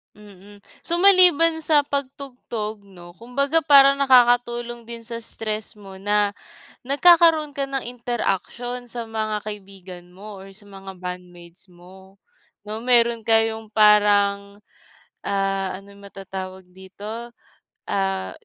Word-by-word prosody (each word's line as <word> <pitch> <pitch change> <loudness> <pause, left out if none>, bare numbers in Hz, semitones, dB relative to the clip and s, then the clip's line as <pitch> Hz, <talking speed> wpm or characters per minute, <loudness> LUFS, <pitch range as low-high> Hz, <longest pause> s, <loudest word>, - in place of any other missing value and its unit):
Mm. 205 -1 -16 0.2
So, 340 +1 +1
maliban 345 -4 +5
sa 295 -2 +2
pagtugtog 255 -6 -6
'no, 175 -3 -15
kumbaga 280 - -1
parang 275 -2 +6
nakakatulong 240 -3 +2
din 230 0 -10
sa 230 -1 -7
stress 215 -1 -5
mo 195 -2 -12
na 205 +1 0 0.5
nagkakaroon 320 +1 +4
ka 280 -1 -4
ng 270 -1 -4
interaksyon 245 +1 -4
sa 240 0 -6
mga 215 -2 -4
kaibigan 190 -4 -11
mo 205 +1 -11
or 195 0 -13
sa 210 - -14
mga 195 -1 -11
bandmates 180 0 -10
mo, 190 +2 -18 0.4
'no? 210 +1 -6
Meron 235 -2 +2
kayong 225 0 +1
parang, 205 -1 +3 0.6
ah, 195 -1 -2
ano 200 - -17
matatawag 190 -1 -9
dito, 210 +6 -10 0.6
ah, 195 -1 -2
215 Hz, 115 wpm, -22 LUFS, 195-245 Hz, 0.6 s, parang